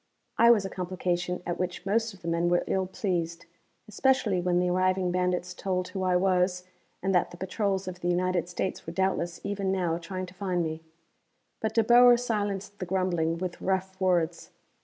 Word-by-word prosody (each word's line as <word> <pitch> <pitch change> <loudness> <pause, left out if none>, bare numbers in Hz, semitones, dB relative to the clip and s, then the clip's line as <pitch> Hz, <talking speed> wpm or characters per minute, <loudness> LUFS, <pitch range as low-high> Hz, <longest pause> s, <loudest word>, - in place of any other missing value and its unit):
I 235 - +7
was 215 -4 +5
a - - -3
complication 180 -1 -2
at 175 0 -3
which 180 0 -3
most 225 +3 +1
of 190 - -17
the - - -6
men 170 +1 +1
were 175 0 +2
ill 190 -1 0
pleased, 175 -3 -2 0.4
especially 215 -4 +2
when 175 0 +1
the 180 0 +2
arriving 185 0 +1
bandits 180 0 -1
told 185 -1 -2
who 190 - -4
I 185 -1 +2
was, 180 0 +2 0.4
and 195 0 +1
that 180 - +3
the 175 - -12
patrols 195 0 -1
of 180 -1 -6
the 175 - -2
United 175 0 0
States 180 -1 -3
were 165 - -5
doubtless 175 -2 -1
even 200 -1 -1
now 175 -3 0
trying 185 +2 -5
to 180 - -13
find 185 -2 -1
me. 160 0 -4 0.8
But 220 0 -2
De 225 - +4
Boer 245 +2 +7
silenced 205 -4 -3
the 185 - -3
grumbling 175 -3 0
with 180 0 -5
rough 190 0 -2
words. 175 -2 +1
185 Hz, 190 wpm, -28 LUFS, 175-195 Hz, 0.8 s, I